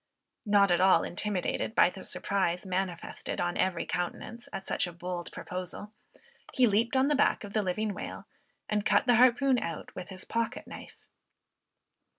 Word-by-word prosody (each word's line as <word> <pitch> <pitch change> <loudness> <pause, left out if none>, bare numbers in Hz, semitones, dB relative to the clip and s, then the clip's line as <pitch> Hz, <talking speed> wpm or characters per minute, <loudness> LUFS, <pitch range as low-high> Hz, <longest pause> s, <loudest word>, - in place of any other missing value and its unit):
Not 200 -2 +5
at 175 - +3
all 190 0 +5
intimidated 210 +3 -2
by 180 - +5
the 190 - -10
surprise 190 -2 -1
manifested 185 -2 -3
on 175 0 0
every 185 -3 0
countenance 180 +7 -4
at 195 0 -6
such - - 0
a - - -6
bold 175 0 -5
proposal, 185 +3 -6 0.6
he 255 - +5
leaped 230 +3 +2
on 260 +1 +4
the 295 - +3
back 285 - +2
of 205 0 -8
the 215 - +2
living 205 +2 -1
whale, - - -7 0.4
and 210 -1 0
cut 275 - +3
the 245 -2 +5
harpoon 255 +1 +5
out 165 - -5
with 180 - -7
his 185 -1 -8
pocket 230 +1 -2
knife. - - -11
200 Hz, 165 wpm, -29 LUFS, 180-230 Hz, 0.6 s, Not